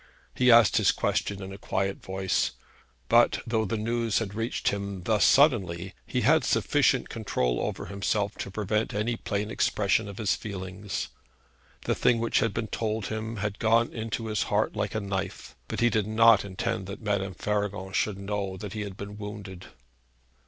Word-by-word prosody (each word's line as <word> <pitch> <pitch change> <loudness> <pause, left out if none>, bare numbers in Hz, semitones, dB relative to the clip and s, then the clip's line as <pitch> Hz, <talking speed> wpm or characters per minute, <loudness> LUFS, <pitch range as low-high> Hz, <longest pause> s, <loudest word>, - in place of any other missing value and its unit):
He 125 0 +3
asked 115 -4 +7
his - - +4
question 100 -1 -1
in 95 0 -7
a 100 - -10
quiet 95 -1 -2
voice; 95 0 -1 0.5
but, - - +4
though 110 -1 0
the 110 +3 -2
news 115 0 0
had 105 -3 -2
reached 115 +3 -1
him 100 -2 -4
thus 105 +1 +2
suddenly, 95 - +3
he - - -1
had - - +4
sufficient - - +2
control 60 -1 -1
over - - -3
himself 100 +1 -1
to - - -4
prevent 105 +2 -1
any 110 +3 0
plain 105 -1 -3
expression 105 +1 +1
of 100 - -8
his 110 -3 +1
feelings. 100 -1 -5 0.7
The - - +1
thing 120 - +3
which 115 0 +1
had 115 -4 +1
been 110 +1 -3
told 110 -2 -2
him 110 +1 -4
had 105 0 -3
gone 115 +1 +3
into 115 -1 -3
his 110 -1 -1
heart - - +1
like - - -2
a - - +1
knife; 95 -2 -4
but - - -3
he 120 0 +4
did 105 -2 +1
not 115 -1 +6
intend 100 +1 -3
that 100 +3 -8
Madame 100 -3 -1
Faragon 100 -1 -2
should 100 +1 0
know 100 -1 -3
that 100 +1 -7
he 105 - -4
had 100 -2 -6
been 105 +1 -8
wounded. 105 -3 -8
105 Hz, 180 wpm, -27 LUFS, 95-110 Hz, 0.7 s, asked